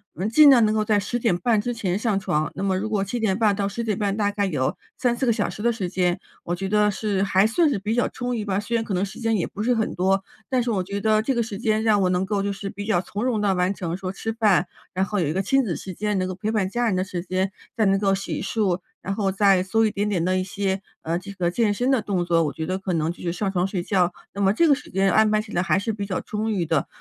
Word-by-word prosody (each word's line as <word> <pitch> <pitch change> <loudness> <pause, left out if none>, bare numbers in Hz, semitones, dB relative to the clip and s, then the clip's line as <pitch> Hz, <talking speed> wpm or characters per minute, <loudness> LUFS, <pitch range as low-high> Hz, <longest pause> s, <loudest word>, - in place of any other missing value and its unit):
嗯 190 +4 -2
尽 295 +4 +7
量 240 -5 +6
能 215 0 +1
够 215 - +2
在 210 -1 +2
10 225 +5 -2
点 210 -7 +1
半 220 0 +2
之 245 +2 -2
前 195 -5 -1
上 210 -3 0
床。 155 -5 -1
那 190 - -5
么 190 -1 +1
如 215 +3 -2
果 210 -3 0
7 240 +5 -3
点 195 -3 +1
半 210 -3 +3
到 200 -1 -1
10 235 +4 -4
点 215 -4 -1
半， 205 0 -1
大 205 -1 +2
概 205 -1 0
有 145 -8 -1 0.2
3-4 245 0 0
个 235 - +3
小 - - 0
时 210 - -7
的 235 +1 +3
时 205 -6 -3
间， 180 0 0 0.2
我 175 - -3
觉 190 +2 -3
得 210 0 +3
是 200 -1 -1
还 195 +1 +3
算 310 +7 +3
是 210 - -1
比 215 +4 -2
较 245 - +1
充 245 -1 -3
裕 215 - -2
吧， 200 -1 -1
虽 230 +3 -3
然 225 - +1
可 205 - -4
能 185 +2 +1
时 195 - -10
间 225 -1 +1
也 170 - -1
不 210 - -5
是 245 +1 +2
很 220 -2 -1
多， 190 +2 +2 0.3
但 255 -2 +2
是 240 - -2
我 190 -3 0
觉 200 +2 -4
得 215 0 +3
这 265 +4 0
个 235 - +1
时 220 -3 -4
间， 215 0 +1
让 215 -3 +3
我 180 - +2
能 180 +1 +1
够 200 0 -1
就 200 - -1
是 195 0 -5
比 205 +1 -7
较 215 -5 +2
从 205 +4 -5
容 245 -4 +1
地 205 -2 +2
完 180 +2 +1
成 175 -3 -4
说 185 -1 -4
吃 225 +3 -4
饭， 205 -5 +3 0.3
然 190 +1 +1
后 205 0 -2
有 155 - 0
一 - - 0
个 190 - 0
亲 270 +3 +3
子 180 -7 -2
时 185 - -7
间， 210 +2 -1
能 185 0 0
够 185 - -3
陪 200 +4 -3
伴 205 -4 +1
家 240 +2 0
人 195 - +1
的 185 - +1
时 185 -3 -4
间， 185 +1 -1 0.3
再 220 - +3
能 195 0 +3
够 195 -1 +2
洗 195 - -4
漱， 195 -3 0 0.2
然 195 - -3
后 195 -2 0
再 195 -2 +4
做 225 +4 +2
一 215 - +1
点 205 +1 -1
点 175 -5 0
的 185 0 +1
一 - - -1
些 195 0 -2 0.2
呃， 165 +2 -1
这 200 +2 -9
个 175 -2 -1
健 220 0 +2
身 245 +6 0
的 255 -5 +3
动 185 -4 -1
作， 165 -1 +3
我 145 - -1
觉 160 - -4
得 185 +2 -2
可 190 -2 -3
能 160 0 0
就 - - -11
是 170 - -1
上 195 +2 -2
床 180 0 +1
睡 185 -3 -3
觉， 180 -3 +2 0.2
那 200 - -4
么 195 0 +4
这 330 +9 +3
个 290 - +6
时 275 - -5
间， 195 0 +2
安 220 0 +4
排 215 0 +2
起 215 0 -6
来 175 - +1
还 185 - +2
是 220 +2 -1
比 200 -1 -4
较 185 - -2
充 220 +1 -3
裕 180 -5 0
的。 160 -3 0
200 Hz, 325 characters per minute, -24 LUFS, 185-220 Hz, 0.3 s, 尽